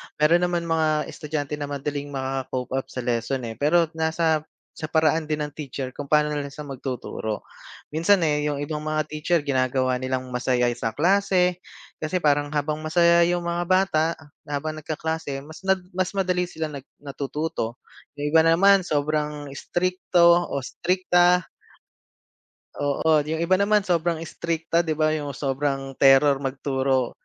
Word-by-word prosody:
Mayro'n 170 +4 +3
naman 175 -1 -1
mga 160 -2 0
estudyante 150 -1 -4
na 145 - -3
madaling 145 0 -4
maka-cope 130 -2 -4
up 135 0 -2
sa 125 - -6
lesson, 120 +2 -1
eh. 115 -1 -6
Pero 170 +4 +4 0.2
nasa 160 -1 +1 0.2
sa 155 - -6
paraan 155 0 +2
din 150 -1 -1
ng 150 - -5
teacher 135 -3 -6
kung 145 +2 -7
pa'no 150 +1 +3
na 150 - -1
lang 140 - -4
siya 150 +2 -9
magtuturo. 125 -5 -5 0.5
Minsan, 170 +4 +3
eh, 150 -1 +1
yung 145 - -1
ibang 150 +1 -3
mga 155 0 -1
teacher 155 +1 0
ginagawa 130 -2 +1
nilang 130 0 -3
masaya 125 -1 +1
sa 115 -1 -2
klase 180 +1 +2 0.4
kasi 175 +3 -2
parang 145 -1 +3
habang 150 +1 -1
masaya 170 +2 +4
yung 175 0 0
mga 170 0 -2
bata 185 -4 +3 0.4
na 145 - -3
habang 155 +2 -4
nagkaklase 155 -2 -4
mas 155 +2 -11
nag 190 -1 +2
mas 185 +2 -2
madali 180 -2 0
sila 160 -3 -5
nag 140 -2 -9 0.2
natututo. 140 -3 -3 0.4
Yung 145 0 -3
iba 160 - +6
naman 195 +4 +6
sobrang 150 -1 -1
istrikto 175 +2 +2
o 140 -2 -3
istrikta. 180 +3 +2 1.4
Oo, 150 +2 +2
yung 160 +1 -1
iba 185 +3 +3
naman 210 0 +3
sobrang 170 -2 0
istrikta 165 0 -2
'di 160 -2 0
ba, 155 0 +2
yung 145 -3 -3
sobrang 135 0 -2
terror 135 +1 +6
magturo. 135 -1 -1
150 Hz, 155 wpm, -24 LUFS, 140-170 Hz, 1.4 s, iba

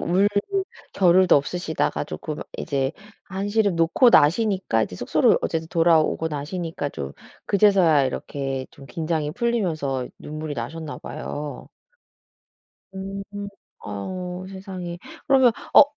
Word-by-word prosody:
울 185 +4 +3 0.7
겨를도 185 -2 +5
없으시다가 160 +3 -1
쪼끔 155 -2 -5 0.2
이제 135 -1 -1 0.3
한시름 200 0 0
놓고 165 +10 +5
나시니까 185 - +3
이제 90 - -9
숙소로 - - +3
어쨌든 160 0 -2
돌아오고 165 -1 +3
나시니까 155 +1 -4
좀 70 - -6 0.3
그제서야 190 -8 +5
이렇게 135 0 -3
좀 135 -1 -14
긴장이 155 -2 -2
풀리면서 165 - -1
눈물이 155 0 -5
나셨나 150 +6 -5
봐요. 145 0 -6 1.3
음 195 +1 -5 0.6
어유 180 - -5
세상에. 185 -2 -7 0.3
그러면 265 -4 +5 0.2
어 - - +11
165 Hz, 270 characters per minute, -24 LUFS, 145-190 Hz, 1.3 s, 어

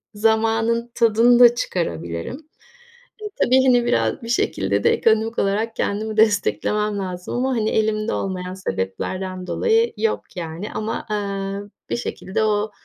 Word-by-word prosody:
zamanın 225 +2 +1
tadını 235 +1 +4
da 240 -1 +8
çıkarabilirim. 85 - -3 0.9
E, - - -5 0.2
tabii, 260 +1 +4
hani, 245 -2 +4
biraz 240 - 0
bir 230 - -7
şekilde 235 - 0
de 460 - +5
ekonomik 225 - +1
olarak 215 +3 0
kendimi 215 +2 -2
desteklemem 210 0 +1
lazım 180 0 -5
ama, 260 +2 0
hani, 220 -4 0
elimde 215 0 0
olmayan 185 -1 -3
sebeplerden 185 - -4
dolayı 455 - +2
yok, 445 - -2
yani, 165 +4 -5
ama, 215 +1 -3
eee, 200 -1 -3 0.2
bir - - 0
şekilde 205 -3 -3
o, 210 0 0
215 Hz, 135 wpm, -21 LUFS, 195-230 Hz, 0.9 s, da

